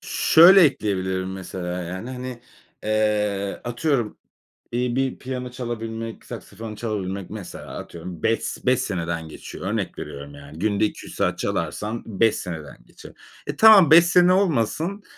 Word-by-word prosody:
Şöyle 180 +4 +6
ekleyebilirim, 95 -7 -1
mesela, 90 -1 -5
yani, 95 +8 -6
hani, 125 -1 -6 0.4
eee, 105 -2 0
atıyorum, 120 -2 -1 0.6
iyi 120 0 -1
bir 135 0 -1
piyano 125 -1 -5
çalabilmek, 115 -2 -6
saksafon 110 -1 -8
çalabilmek, 100 -4 -4
mesela, 105 -4 -8
atıyorum 85 -1 -9
5 115 0 +2
s - - -5
beş 125 0 +3
seneden 85 -4 -3
geçiyor. 80 - -8
Örnek - - -3
veriyorum, 70 +1 -8
yani. 70 +2 -12
Günde 105 +1 +1
2-3 - - -6
saat - - 0
çalarsan 110 +2 -3
5 115 +1 +2
seneden 80 -5 -7
geçer. - - -14 0.4
Eee, - - -3
tamam 210 -8 +8
5 170 +1 +9
sene 180 +1 +5
olmasın. 180 - 0
110 Hz, 140 wpm, -23 LUFS, 95-125 Hz, 0.6 s, 5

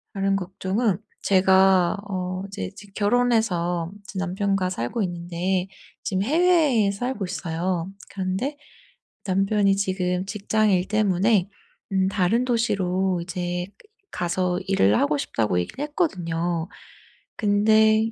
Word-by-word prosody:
다른 195 0 +1
걱정은 195 +2 -1 0.3
제가 190 -1 +4
어 185 -1 -3
이제 145 - -5
직 200 -1 -14
결혼해서 205 -7 +1
이제 200 -1 -10
남편과 190 0 0
살고 185 - -2
있는데 175 +1 -2 0.4
지금 190 -1 -1
해외에 300 - +3
살고 245 +1 -3
있어요. 180 0 -3 0.2
그런데 195 +10 -3 0.7
남편이 195 +1 +2
지금 185 -2 -1
직장 210 +1 0
일 180 0 +1
때문에 205 -1 +2 0.4
음 190 0 +2
다른 200 +5 +1
도시로 190 -6 0
이제 175 0 -3 0.4
가서 180 +1 -1
일을 110 - +3
하고 145 +1 +2
싶다고 110 -9 0
얘기를 90 - -5
했거든요. 175 - -1 0.7
근데 220 +1 +4
190 Hz, 250 characters per minute, -24 LUFS, 180-210 Hz, 0.7 s, 제가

